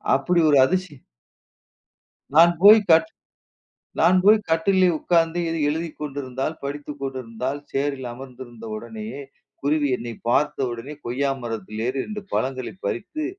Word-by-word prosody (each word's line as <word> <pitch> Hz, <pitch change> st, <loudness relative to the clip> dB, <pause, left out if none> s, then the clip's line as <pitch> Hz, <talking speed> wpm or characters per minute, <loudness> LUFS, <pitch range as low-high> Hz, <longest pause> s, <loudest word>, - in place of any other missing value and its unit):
அப்படி 170 Hz, +6 st, +1 dB
ஒரு 145 Hz, -, +5 dB
அதிசய 185 Hz, -3 st, -2 dB, 1.4 s
நான் 170 Hz, +2 st, +8 dB
போயி, 210 Hz, +3 st, +9 dB
கட் 160 Hz, 0 st, +5 dB, 0.9 s
நான் 185 Hz, +1 st, +5 dB
போயி 215 Hz, +1 st, +7 dB
கட்டில்லே 185 Hz, +3 st, +3 dB
உட்காந்து 165 Hz, 0 st, +1 dB
எதுவும் 160 Hz, -3 st, 0 dB
எழுதிக் 160 Hz, +1 st, -3 dB
கொண்டிருந்தால், 135 Hz, 0 st, -4 dB
படித்துக் 145 Hz, 0 st, -6 dB
கொண்டிருந்தால், 130 Hz, 0 st, -4 dB
சேரில் 135 Hz, -2 st, -2 dB
அமர்ந்திருந்த 120 Hz, -2 st, -11 dB
உடனேயே 110 Hz, +4 st, -7 dB, 0.4 s
குருவி 145 Hz, 0 st, +1 dB
என்னை 115 Hz, -1 st, -7 dB
பார்த்த 135 Hz, 0 st, +1 dB
உடனே, 130 Hz, +6 st, -7 dB
கொய்யா 135 Hz, +3 st, 0 dB
மரத்தில் 110 Hz, -1 st, -5 dB
ஏறி 130 Hz, +1 st, -2 dB
2 210 Hz, -1 st, -6 dB
பழங்களை 130 Hz, +1 st, -2 dB
பறித்து, 310 Hz, +8 st, -4 dB
140 Hz, 125 wpm, -23 LUFS, 130-165 Hz, 1.4 s, போயி